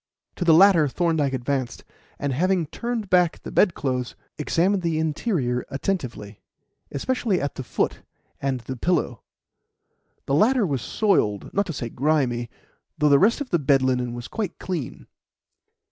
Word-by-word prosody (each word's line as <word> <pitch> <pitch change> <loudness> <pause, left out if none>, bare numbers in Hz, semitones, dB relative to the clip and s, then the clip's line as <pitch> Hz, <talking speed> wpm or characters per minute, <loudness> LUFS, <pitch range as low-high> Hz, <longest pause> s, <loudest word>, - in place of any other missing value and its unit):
To - - -1
the 165 -2 +6
latter 175 -4 +6
Thorndyke 155 -2 0
advanced, 130 -1 -3 0.3
and, 140 -2 -2
having 180 +4 +1
turned 235 +6 -4
back 180 -3 +3
the - - -7
bedclothes, 130 - +1 0.2
examined 180 +6 +1
the 165 -2 -1
interior 155 - -1
attentively, 125 - -4 0.5
especially 205 - 0
at 140 -1 -3
the - - -6
foot 125 - -2 0.4
and 135 -2 -1
the 130 +3 -6
pillow. 125 - 0 1.0
The 135 - -2
latter 225 - +4
was 140 -8 -1
soiled 110 - 0
not 200 0 +1
to 165 - -4
say 120 -4 -4
grimy 125 -4 0 0.5
though 150 -1 +3
the 140 -1 +6
rest 230 +8 +3
of 275 - -5
the 175 - +3
bed 135 -2 +3
linen 125 -2 0
was 120 -1 -7
quite 205 -5 -4
clean. 170 -9 -5
150 Hz, 150 wpm, -24 LUFS, 130-185 Hz, 1.0 s, the